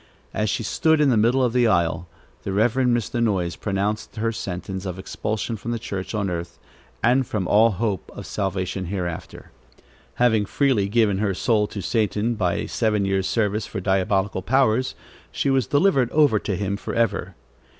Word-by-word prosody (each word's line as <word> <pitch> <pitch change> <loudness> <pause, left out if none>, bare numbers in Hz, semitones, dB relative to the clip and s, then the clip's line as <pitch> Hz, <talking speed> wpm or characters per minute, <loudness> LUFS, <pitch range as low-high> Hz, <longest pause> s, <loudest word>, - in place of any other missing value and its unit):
As 105 0 0
she 115 - -1
stood 160 +8 +2
in 150 -2 +4
the - - +3
middle 120 +5 +3
of 120 -2 +1
the 125 -2 +4
aisle, 85 -3 +1 0.3
the 100 - -4
Reverend 120 +4 +2
Mr. 120 +1 -2
Noyes 95 -6 0
pronounced 105 +2 -2
her 115 +1 0
sentence 95 -2 -5
of 90 -1 -4
expulsion 110 +4 -3
from 110 - -7
the 120 - -1
church 100 -3 -5
on 100 -2 0
earth 85 -1 -5 0.5
and 125 +2 +3
from 100 -4 -2
all 110 +2 +5
hope 95 -3 -2
of - - -8
salvation 95 -1 -2
hereafter. 90 -2 -5 0.6
Having 110 -4 +2
freely 125 -8 +1
given 105 -3 +2
her 100 -3 0
soul 105 0 +2
to 100 -2 -6
Satan 110 +2 0
by 90 -6 0
a 105 - -3
seven 105 -2 0
years' 95 -1 0
service 105 -1 0
for 105 - -5
diabolical 95 0 0
powers, 125 +3 +2 0.4
she 140 - 0
was 130 -5 +2
delivered 145 -5 +3
over 145 -8 +4
to 100 - -2
him 100 +1 -2
forever. 115 +3 -1
105 Hz, 175 wpm, -23 LUFS, 95-120 Hz, 0.6 s, all